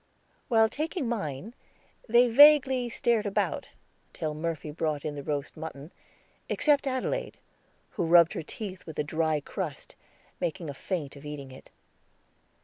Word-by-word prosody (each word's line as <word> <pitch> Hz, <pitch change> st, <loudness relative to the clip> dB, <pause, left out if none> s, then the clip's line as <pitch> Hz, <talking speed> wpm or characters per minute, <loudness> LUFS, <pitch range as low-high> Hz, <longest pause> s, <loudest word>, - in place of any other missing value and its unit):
While 225 Hz, -2 st, +5 dB
taking 305 Hz, +3 st, -3 dB
mine, 200 Hz, -, -4 dB, 0.6 s
they 240 Hz, +2 st, +6 dB
vaguely 265 Hz, -1 st, +6 dB
stared 230 Hz, -2 st, +1 dB
about 200 Hz, -, -1 dB, 0.5 s
till 155 Hz, -2 st, -3 dB
Murphy 155 Hz, -1 st, -4 dB
brought 150 Hz, -1 st, -2 dB
in 150 Hz, -, -2 dB
the 145 Hz, -, -6 dB
roast 145 Hz, 0 st, -3 dB
mutton, 155 Hz, -1 st, -8 dB, 0.6 s
except 290 Hz, -2 st, +2 dB
Adelaide, 370 Hz, -, -2 dB, 0.5 s
who -, -, -2 dB
rubbed 170 Hz, 0 st, +6 dB
her -, -, -3 dB
teeth 190 Hz, +3 st, -8 dB
with 160 Hz, -, -8 dB
a -, -, +1 dB
dry 155 Hz, 0 st, 0 dB
crust, -, -, -6 dB, 0.4 s
making 165 Hz, -2 st, -3 dB
a -, -, -8 dB
feint 150 Hz, -1 st, -4 dB
of 140 Hz, -, -12 dB
eating 145 Hz, -2 st, -7 dB
it. 130 Hz, -, -14 dB
170 Hz, 140 wpm, -28 LUFS, 150-240 Hz, 0.6 s, they